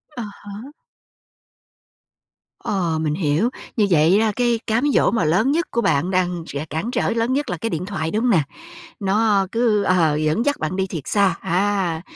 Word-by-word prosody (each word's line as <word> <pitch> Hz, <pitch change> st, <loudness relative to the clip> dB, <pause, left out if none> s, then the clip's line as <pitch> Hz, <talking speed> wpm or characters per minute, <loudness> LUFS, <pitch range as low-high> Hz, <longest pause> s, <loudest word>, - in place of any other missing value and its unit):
À 245 Hz, -, -4 dB
há. 205 Hz, +4 st, -10 dB, 1.9 s
Ờ. 170 Hz, -5 st, -1 dB
Mình 155 Hz, -2 st, 0 dB
hiểu. 165 Hz, +6 st, +1 dB, 0.3 s
Như 215 Hz, -, +4 dB
vậy 170 Hz, +3 st, +4 dB
đó 225 Hz, -, +2 dB
là 215 Hz, -, +1 dB
cái 240 Hz, -2 st, +1 dB
cám 225 Hz, +3 st, +1 dB
dỗ -, -, +3 dB
mà 225 Hz, -6 st, 0 dB
lớn 190 Hz, -, +2 dB
nhất 335 Hz, +4 st, +1 dB
của 235 Hz, -, 0 dB
bạn 160 Hz, -1 st, +1 dB
đang 180 Hz, -2 st, 0 dB
sẽ 140 Hz, +2 st, -5 dB
cản 160 Hz, +11 st, -3 dB
trở -, -, 0 dB
lớn 230 Hz, +2 st, 0 dB
nhất 290 Hz, +2 st, -1 dB
là -, -, -2 dB
cái 225 Hz, -, -3 dB
điện 170 Hz, -2 st, -3 dB
thoại, 175 Hz, -5 st, -3 dB
đúng 215 Hz, -, 0 dB
hông 250 Hz, -, +3 dB
nè? 165 Hz, -8 st, +3 dB, 0.6 s
Nó 200 Hz, 0 st, +2 dB
cứ 225 Hz, -3 st, +2 dB
ờ, 170 Hz, -6 st, +2 dB
dẫn 155 Hz, -, 0 dB
dắt 285 Hz, 0 st, 0 dB
bạn 155 Hz, +4 st, -3 dB
đi 190 Hz, 0 st, -1 dB
thật 165 Hz, -, -4 dB
xa. 200 Hz, -4 st, +2 dB
A, 185 Hz, -2 st, 0 dB
195 Hz, 200 wpm, -21 LUFS, 165-225 Hz, 1.9 s, Như